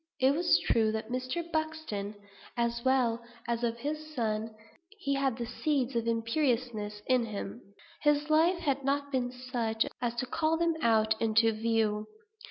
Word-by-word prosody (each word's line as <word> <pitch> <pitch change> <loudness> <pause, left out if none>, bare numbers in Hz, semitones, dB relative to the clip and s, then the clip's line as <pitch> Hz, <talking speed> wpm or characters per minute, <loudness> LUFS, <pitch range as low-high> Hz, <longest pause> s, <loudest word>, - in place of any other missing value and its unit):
It 265 +1 +5
was 335 +1 +4
true 225 -1 +3
of 220 - -5
Mr. 255 +7 -3
Buxton, 315 -11 -2 0.4
as 235 0 0
well 245 -3 +2 0.2
as 235 0 -1
of 235 -1 0
his 305 +4 -5
son, 220 -3 0
that 220 - -16 0.4
he 280 -8 -1
had 275 -3 +1
the 240 - -3
seeds 265 +1 -1
of 230 0 0
imperiousness 230 -3 0
in 250 -2 +2
him. 210 +2 -5 0.4
His 295 0 +3
life 330 +4 +4
had 280 -5 -1
not 280 +1 0
been 250 -2 0
such 245 -3 -1 0.2
as 240 -1 -1
to 240 - -1
call 315 +5 +1
them 335 0 +2
out 220 -3 +4
into 225 0 +4
view. 215 -1 0
245 Hz, 165 wpm, -30 LUFS, 225-285 Hz, 0.4 s, It